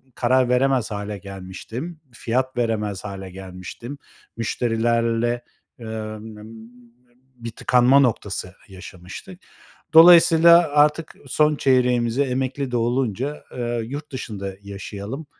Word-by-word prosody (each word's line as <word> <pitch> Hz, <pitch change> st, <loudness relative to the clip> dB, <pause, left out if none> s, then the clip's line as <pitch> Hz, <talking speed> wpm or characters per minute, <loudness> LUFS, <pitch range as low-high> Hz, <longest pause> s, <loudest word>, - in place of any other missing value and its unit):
karar 125 Hz, 0 st, +2 dB
veremez 125 Hz, -2 st, +1 dB
hâle 105 Hz, 0 st, -5 dB
gelmiştim, 100 Hz, -, -8 dB
fiyat 125 Hz, +2 st, -2 dB
veremez 105 Hz, -5 st, -2 dB
hâle 95 Hz, -2 st, -7 dB
gelmiştim, 95 Hz, +8 st, -9 dB, 0.4 s
müşterilerle, 115 Hz, +1 st, 0 dB, 0.4 s
ııı, 110 Hz, -1 st, -6 dB
ımm, 110 Hz, 0 st, -11 dB
ımm, 110 Hz, +1 st, -12 dB, 0.7 s
bir 115 Hz, -1 st, -7 dB
tıkanma 125 Hz, +4 st, +3 dB
noktası 100 Hz, -7 st, -1 dB
yaşamıştık. 95 Hz, -, -11 dB, 0.5 s
Dolayısıyla 170 Hz, 0 st, +7 dB
artık 150 Hz, +2 st, +2 dB
son 150 Hz, +3 st, +2 dB
çeyreğimize 125 Hz, -1 st, +2 dB
emekli 130 Hz, 0 st, -3 dB
de 120 Hz, -, 0 dB
olunca, 125 Hz, +3 st, -2 dB
aaa, 120 Hz, -1 st, -3 dB
yurt 145 Hz, +6 st, -7 dB
dışında 100 Hz, -7 st, -6 dB
yaşayalım, 100 Hz, +7 st, -7 dB
120 Hz, 105 wpm, -22 LUFS, 105-135 Hz, 0.7 s, Dolayısıyla